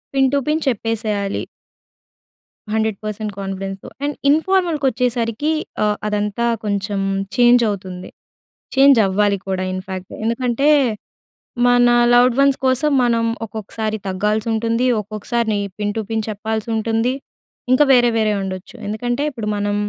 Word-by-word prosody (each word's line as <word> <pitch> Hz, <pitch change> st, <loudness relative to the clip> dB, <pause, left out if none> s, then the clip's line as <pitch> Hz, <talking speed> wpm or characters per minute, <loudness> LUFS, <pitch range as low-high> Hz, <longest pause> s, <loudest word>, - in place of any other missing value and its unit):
Pin 270 Hz, -1 st, +4 dB
to 280 Hz, -, +4 dB
pin 310 Hz, +1 st, +1 dB
చెప్పేసేయాలి. 215 Hz, -4 st, -1 dB, 1.3 s
100% 215 Hz, -1 st, -2 dB
కాన్ఫిడెన్స్‌తో. 195 Hz, 0 st, -5 dB, 0.2 s
And 290 Hz, 0 st, -1 dB, 0.2 s
ఇన్ఫార్మల్‍కి 330 Hz, -2 st, +1 dB
వచ్చేసరికి 245 Hz, +3 st, -1 dB, 0.3 s
ఆహ్, 210 Hz, -1 st, +1 dB
అదంతా 210 Hz, +2 st, -1 dB, 0.2 s
కొంచెం 200 Hz, 0 st, -1 dB, 0.4 s
చేంజ్ 240 Hz, 0 st, +5 dB
అవుతుంది. 185 Hz, -2 st, -6 dB, 0.7 s
చేంజ్ 275 Hz, -1 st, +6 dB
అవ్వాలి 200 Hz, +1 st, +1 dB
కూడా 185 Hz, -1 st, -1 dB
ఇన్ 185 Hz, -, -3 dB
ఫాక్ట్. 185 Hz, -1 st, -6 dB
ఎందుకంటే 245 Hz, +4 st, +1 dB, 1.0 s
మన 245 Hz, 0 st, +5 dB, 0.2 s
లవ్డ్ 245 Hz, 0 st, +5 dB
వన్స్ 275 Hz, -1 st, +4 dB
కోసం 265 Hz, +4 st, +2 dB
మనం 230 Hz, -1 st, +2 dB, 0.2 s
ఒక్కొక్కసారి 220 Hz, 0 st, -4 dB
తగ్గాల్సుంటుంది. 220 Hz, +4 st, 0 dB, 0.2 s
ఒక్కొక్కసారి 215 Hz, +1 st, -2 dB, 0.2 s
పిన్ 205 Hz, 0 st, -2 dB
టు 220 Hz, -, -1 dB
పిన్ 220 Hz, -1 st, -1 dB
చెప్పాల్సుంటుంది. 220 Hz, +3 st, -1 dB, 0.6 s
ఇంక 255 Hz, -, +4 dB
వేరే 240 Hz, -1 st, +5 dB
వేరే 215 Hz, -1 st, +2 dB
ఉండొచ్చు. 185 Hz, 0 st, -6 dB
ఎందుకంటే 240 Hz, +6 st, -2 dB
ఇప్పుడు 230 Hz, -5 st, -6 dB
మనం, 205 Hz, 0 st, -1 dB
220 Hz, 120 wpm, -19 LUFS, 205-245 Hz, 1.3 s, చేంజ్